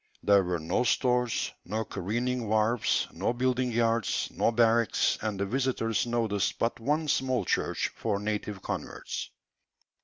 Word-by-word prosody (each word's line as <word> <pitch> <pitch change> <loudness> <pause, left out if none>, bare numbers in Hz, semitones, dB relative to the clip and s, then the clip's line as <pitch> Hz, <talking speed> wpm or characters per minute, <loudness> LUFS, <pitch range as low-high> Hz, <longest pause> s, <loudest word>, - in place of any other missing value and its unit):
There 100 -1 +5
were 90 -1 -1
no 80 +9 0
stores, 125 -1 +1
no 110 +4 -3
careening 120 +6 -2
wharves, 110 +2 +2
no 95 +7 -1
building 125 0 0
yards, 115 0 +1
no - - +1
barracks, 115 0 +3
and 105 -3 -2
the 100 - +1
visitors 120 -2 0
noticed 115 -4 0
but 115 +1 -1
one 150 +6 0
small 130 -3 +1
church - - 0
for 105 -3 -1
native 105 -1 -3
converts. - - -5
115 Hz, 140 wpm, -29 LUFS, 105-125 Hz, -, There